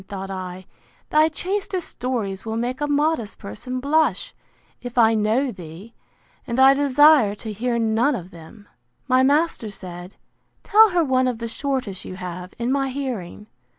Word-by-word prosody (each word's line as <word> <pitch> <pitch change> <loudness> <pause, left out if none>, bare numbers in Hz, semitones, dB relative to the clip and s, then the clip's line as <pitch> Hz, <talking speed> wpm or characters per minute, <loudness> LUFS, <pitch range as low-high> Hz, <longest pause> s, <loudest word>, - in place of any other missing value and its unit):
thought 195 -1 -6
I; 185 -1 -6 0.5
thy 310 +1 +4
chastest 375 +2 -3
stories 225 -7 -3
will 220 0 -4
make 245 +4 -3
a 295 - 0
modest 290 -6 0
person 250 - -6
blush, 310 +4 +1 0.5
if 245 0 -8
I 225 -1 +5
know 225 +5 +1
thee! 185 +3 -11 0.5
and 235 +2 -2
I 265 +1 +8
desire 285 -5 +5
to 220 +1 -7
hear 235 +3 -1
none 230 +5 +1
of 185 -3 -8
them. 190 +5 -14 0.4
My 255 0 +4
master 285 -4 +1
said, 180 -2 -9 0.5
Tell 440 +1 +6
her 355 -2 +2
one 260 -3 +2
of 250 -2 -1
the 230 0 -5
shortest 250 -6 -3
you 185 - -8
have, 180 0 -7
in 235 +2 -1
my 270 0 0
hearing. 250 -8 -5
240 Hz, 160 wpm, -22 LUFS, 200-280 Hz, 0.5 s, I